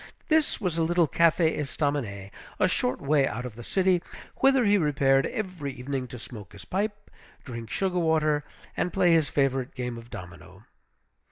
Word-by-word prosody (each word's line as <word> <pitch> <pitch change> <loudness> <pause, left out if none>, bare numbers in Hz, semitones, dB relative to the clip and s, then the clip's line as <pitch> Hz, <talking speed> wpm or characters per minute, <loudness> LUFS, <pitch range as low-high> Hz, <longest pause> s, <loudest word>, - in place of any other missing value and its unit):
This 315 -1 +2
was 180 -6 -1
a - - +3
little 170 0 +3
Café 165 +1 +3
Estaminet, 135 -10 -2 0.3
a - - +4
short 125 - 0
way 140 -1 +3
out 125 +2 -4
of 125 - -6
the 120 +2 -10
city, 185 +4 +2 0.4
whither 270 -2 +4
he 205 0 +5
repaired 140 -6 +3
every 185 - -4
evening 130 0 -4
to 125 - -8
smoke 105 -5 -10
his 100 - -11
pipe, 205 +2 -3 0.3
drink 115 -3 -7
sugar 185 - 0
water, 155 -3 +2 0.3
and 180 - -1
play 180 -3 +3
his 160 -4 +3
favorite 135 -2 0
game 125 -2 -4
of 115 0 -14
domino. 90 +2 -11
145 Hz, 170 wpm, -27 LUFS, 125-175 Hz, 0.4 s, he